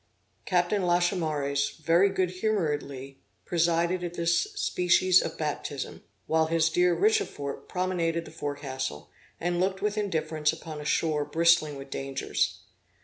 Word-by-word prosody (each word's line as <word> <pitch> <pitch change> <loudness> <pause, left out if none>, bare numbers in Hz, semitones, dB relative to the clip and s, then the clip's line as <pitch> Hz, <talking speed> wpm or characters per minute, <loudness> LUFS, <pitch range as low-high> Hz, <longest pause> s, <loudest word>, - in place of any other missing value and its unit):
Captain 180 +2 +2
Lachaumareys 160 -6 0
very 170 +5 +4
good 185 -2 0
humoredly 145 -10 -2 0.3
presided 170 +1 +1
at 175 0 -4
this 170 - +1
species 185 - +3
of - - -5
baptism, 150 -2 -4 0.2
while 160 0 +2
his 160 0 +2
dear 175 +1 +3
Richefort 410 - 0
promenaded 170 -3 -1
the - - -11
forecastle, 140 - -5 0.3
and 175 +1 -1
looked 190 +1 0
with 210 0 0
indifference 155 -6 0
upon 160 -2 -8
a - - -8
shore 150 0 +1
bristling 160 0 +3
with 135 0 -10
dangers. 135 0 -2
165 Hz, 130 wpm, -28 LUFS, 150-180 Hz, 0.3 s, very